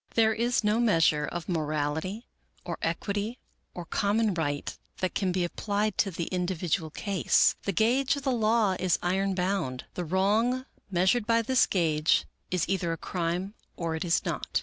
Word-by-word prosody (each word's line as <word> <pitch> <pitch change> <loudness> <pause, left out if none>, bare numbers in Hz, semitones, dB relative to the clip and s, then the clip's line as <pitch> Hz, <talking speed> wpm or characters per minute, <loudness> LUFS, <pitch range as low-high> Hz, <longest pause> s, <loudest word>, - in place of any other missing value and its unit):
There 220 -1 +4
is 235 +1 +1
no 210 +2 +2
measure 165 -9 +3
of 175 -2 -5
morality, 160 +5 -2 0.4
or - - -4
equity, 205 +4 -2 0.4
or 175 - -6
common 205 +3 +1
right 145 -4 -2 0.2
that 185 - -1
can 190 -2 0
be 180 0 0
applied 205 +4 -1
to 200 - +3
the 170 -2 -4
individual 175 -3 -1
case. 195 +4 +2
The 200 - +1
gauge 250 - +2
of 285 - -6
the 265 - +1
law 220 -4 +2
is 185 -2 +2
iron 190 +2 +1
bound. 180 -9 -1
The 180 - -3
wrong 215 +9 +1 0.2
measured 190 +5 +2
by 230 0 +3
this 260 +2 +3
gauge 160 -4 +2 0.2
is 180 -2 0
either 180 -2 0
a 165 - -2
crime 175 +4 -2 0.2
or 165 -2 -2
it 160 - -3
is 175 -1 +1
not. - - -1
190 Hz, 170 wpm, -28 LUFS, 170-220 Hz, 0.4 s, There